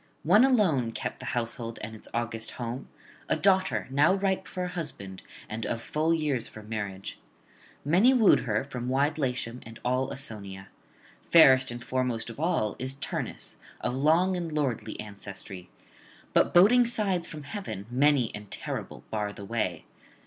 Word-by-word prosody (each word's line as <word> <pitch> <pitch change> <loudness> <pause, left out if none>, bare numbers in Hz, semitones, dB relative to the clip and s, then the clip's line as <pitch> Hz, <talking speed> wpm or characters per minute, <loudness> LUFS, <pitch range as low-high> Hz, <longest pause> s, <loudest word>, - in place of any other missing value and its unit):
One 205 +9 +6
alone 175 - +3
kept - - -4
the - - -7
household 115 0 -3
and 110 +1 -6
its 110 - -13
august 115 -1 -2
home, 120 +2 -5 0.4
a - - +3
daughter 185 - +2
now 150 +7 +4
ripe 195 -1 0
for 180 - -4
a - - -1
husband 135 - -6 0.3
and 110 +1 -5
of 115 - -2
full 155 +7 0
years 150 -7 0
for 110 - -11
marriage. 105 -3 -5 0.7
Many 185 - +5
wooed 235 -6 +6
her 110 -2 -1
from 125 -3 -5
wide 145 +4 +1
Latium 125 -3 -2
and 115 +1 -11
all 130 +1 +1
Ausonia. 100 -7 -5 0.6
Fairest 130 -6 +7
and 120 +1 -6
foremost 125 -3 -1
of 115 - -12
all 155 - +1
[56 130 +1 -1
93]is - - -22
Turnus, - - -3 0.2
of - - -1
long 160 +8 +3
and 170 -2 -3
lordly 140 -6 -2
ancestry; 100 -3 -8 0.6
but - - +4
boding 230 +7 +6
signs 195 -7 0
from 150 -2 -8
heaven, 145 - -6
many 135 -2 +3
and 105 -1 -8
terrible, - - -5
bar 105 -1 -1
the 100 -1 -9
way. 95 -7 -2
130 Hz, 165 wpm, -28 LUFS, 110-165 Hz, 0.7 s, Fairest